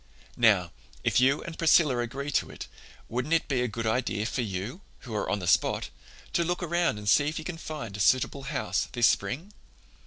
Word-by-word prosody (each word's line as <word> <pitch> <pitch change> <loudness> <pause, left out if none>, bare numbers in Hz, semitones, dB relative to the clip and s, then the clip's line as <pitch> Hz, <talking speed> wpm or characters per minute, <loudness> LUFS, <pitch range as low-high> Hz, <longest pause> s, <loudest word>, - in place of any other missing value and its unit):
"Now, 100 -7 +4 0.3
if - - +3
you 135 +3 +3
and 165 -1 -8
Priscilla 155 -6 +4
agree 135 +5 -3
to - - 0
it, - - -8 0.4
wouldn't 125 +7 0
it 165 - 0
be 130 -3 0
a 125 - +1
good 115 +1 -4
idea 110 -2 0
for 125 - -1
you, 105 - -4 0.2
who 120 - -8
are 105 - -1
on 105 - +1
the 95 - -5
spot, 85 - +2 0.4
to 170 - +2
look 175 +1 -2
around 170 -7 +1
and 105 0 -8
see 145 +8 +5
if 155 - -2
you 160 - -5
can 165 -2 -5
find 135 -12 -6
a - - -6
suitable 130 +6 +2
house 95 -10 -1
this 120 -2 +3
spring? 145 - 0
125 Hz, 210 wpm, -28 LUFS, 110-155 Hz, 0.4 s, see